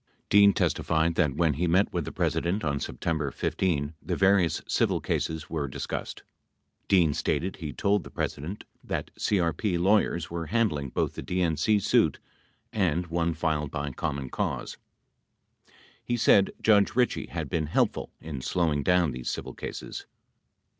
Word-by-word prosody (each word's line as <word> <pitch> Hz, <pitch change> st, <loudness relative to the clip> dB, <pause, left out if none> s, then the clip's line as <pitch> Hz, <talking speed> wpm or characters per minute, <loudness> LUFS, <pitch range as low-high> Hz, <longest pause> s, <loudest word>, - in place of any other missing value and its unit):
Dean 100 Hz, 0 st, +7 dB
testified 80 Hz, -2 st, +1 dB
that, 75 Hz, -5 st, +1 dB
when 80 Hz, -1 st, +2 dB
he 85 Hz, +6 st, -1 dB
met 95 Hz, +5 st, +2 dB
with -, -, -1 dB
the -, -, -5 dB
President 95 Hz, +5 st, 0 dB
on 70 Hz, -2 st, 0 dB
September 75 Hz, -1 st, -2 dB
15, 75 Hz, +2 st, -1 dB
the -, -, -2 dB
various 95 Hz, -3 st, +3 dB
civil -, -, +1 dB
cases 80 Hz, -1 st, -2 dB
were 75 Hz, -3 st, -2 dB
discussed. 65 Hz, -, -5 dB, 0.6 s
Dean 85 Hz, -6 st, +4 dB
stated 95 Hz, +6 st, -1 dB
he 80 Hz, -5 st, -5 dB
told 100 Hz, +4 st, +1 dB
the -, -, -10 dB
President 85 Hz, +9 st, -4 dB, 0.2 s
that -, -, -4 dB
CRP 90 Hz, -1 st, 0 dB
lawyers 90 Hz, -3 st, +2 dB
were 85 Hz, -1 st, -4 dB
handling 100 Hz, -, 0 dB
both -, -, -1 dB
the -, -, -6 dB
DNC 90 Hz, +4 st, +1 dB
suit 105 Hz, -, +3 dB, 0.6 s
and 90 Hz, -4 st, +1 dB
one 85 Hz, -1 st, 0 dB
filed 80 Hz, -2 st, -1 dB
by 75 Hz, -1 st, -3 dB
Common 70 Hz, -2 st, -4 dB
Cause. -, -, -3 dB, 1.3 s
He 120 Hz, -, -1 dB
said 100 Hz, -3 st, +5 dB
Judge 105 Hz, -2 st, +4 dB
Ritchie 125 Hz, -1 st, +1 dB
had 80 Hz, -3 st, -4 dB
been 80 Hz, +2 st, -1 dB
helpful 80 Hz, -, 0 dB
in 75 Hz, -5 st, -6 dB
slowing 80 Hz, -1 st, 0 dB
down 90 Hz, 0 st, +3 dB
these 60 Hz, -1 st, -4 dB
civil -, -, -4 dB
cases. -, -, -7 dB
85 Hz, 150 wpm, -27 LUFS, 75-95 Hz, 1.3 s, Dean